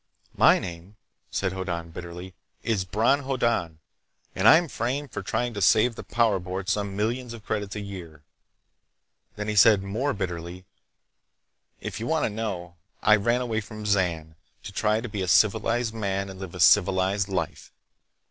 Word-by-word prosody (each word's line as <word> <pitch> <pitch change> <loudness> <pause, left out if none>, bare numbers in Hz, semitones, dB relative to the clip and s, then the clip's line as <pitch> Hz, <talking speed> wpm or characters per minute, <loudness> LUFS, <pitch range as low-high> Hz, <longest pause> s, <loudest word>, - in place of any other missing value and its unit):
"My - - +6
name," 90 +3 -8 0.3
said 95 -2 -1
Hoddan 85 -3 -4
bitterly, 90 +2 -8 0.3
"is 105 -5 0
Bron 115 +9 +2
Hoddan 120 - -1 0.6
and 95 +3 +2
I'm 165 +5 +7
framed 135 +1 -3
for - - -4
trying 120 +5 -2
to 100 - -4
save 115 +5 +4
the - - -8
Power 115 -5 +1
Board 95 +2 -5
some 100 -1 -1
millions 115 +3 -2
of 110 - -13
credits 105 -1 -3
a 105 - -4
year!" 85 -7 -9 1.1
Then 105 0 -5
he 105 - -1
said 105 -1 +6
more 115 +9 -1
bitterly: 90 -1 -5 1.2
"If - - -5
you 115 - -4
want 160 -1 +1
to - - -2
know, 95 -6 -5 0.3
I 105 - +7
ran 120 +4 +1
away 115 -3 -1
from 110 0 -9
Zan 85 -6 0 0.3
to - - -7
try 105 +2 +1
to 120 - -5
be 105 -3 -4
a 95 - -2
civilized 110 +4 +2
man 100 -3 -2
and 95 - -11
live 95 -2 -7
a - - -8
civilized 95 +4 +4
life. 90 -5 -4
100 Hz, 165 wpm, -26 LUFS, 95-115 Hz, 1.2 s, I'm